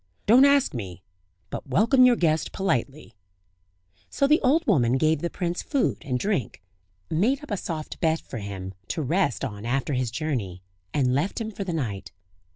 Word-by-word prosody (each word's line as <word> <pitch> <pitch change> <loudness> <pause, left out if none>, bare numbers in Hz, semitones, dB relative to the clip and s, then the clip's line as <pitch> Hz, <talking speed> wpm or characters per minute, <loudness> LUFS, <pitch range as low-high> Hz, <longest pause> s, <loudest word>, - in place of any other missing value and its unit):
"Don't 250 +6 +7
ask 280 -1 +3
me; 95 -7 -7 0.5
but - - -6
welcome 235 - +4
your 250 -1 +6
guest 160 -5 +1
politely." 140 -7 -2 1.0
So 275 - +1
the 300 +3 +4
old 300 +6 +3
woman 130 - +3
gave 155 +2 +2
the 170 - -1
prince 175 0 -3
food 280 -4 0
and 125 -2 -1
drink, 130 - -2 0.5
made 240 - +1
up 295 - -10
a - - +1
soft 160 -4 -5
bed 160 -1 +2
for 115 - -8
him, 95 -2 -6
to 155 - -2
rest 165 0 0
on 105 -5 -7
after 135 +4 -1
his 125 -2 0
journey, 115 - -3 0.3
and 130 -1 +1
left 150 - -1
him 220 -1 -4
for 200 - -5
the 185 - -4
night. 100 -10 -4
155 Hz, 175 wpm, -25 LUFS, -, 1.0 s, Don't